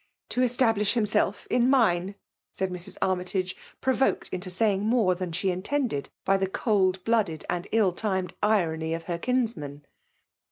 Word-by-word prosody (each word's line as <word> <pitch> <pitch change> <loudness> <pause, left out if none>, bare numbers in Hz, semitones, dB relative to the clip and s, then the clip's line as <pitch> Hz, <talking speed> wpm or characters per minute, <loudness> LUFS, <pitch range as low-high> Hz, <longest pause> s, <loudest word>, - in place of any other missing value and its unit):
" - - -56
To 250 - +1
establish 230 -4 +2
himself 210 -2 +1
in 245 0 +3
mine,*^ 200 -7 +2 0.4
replied 190 -1 -1
Mrs. 175 0 -9
Armytagc, 185 0 -1 0.3
provoked 265 0 +1
into 185 0 -5
saying 195 +1 +2
more 220 -4 +3
than 180 -1 -4
she 190 +4 -1
intended^ 210 - -1 0.2
by 195 0 +4
the 190 -1 -1
cold 190 -3 +1
blooded 215 -9 0
and 175 +2 -3
ill* 215 -4 +3
timed 190 -1 -2
i^ny 165 -6 +1
of 165 - -6
her 170 0 -3
kinsman. 220 - -2
195 Hz, 155 wpm, -27 LUFS, 180-225 Hz, 0.4 s, by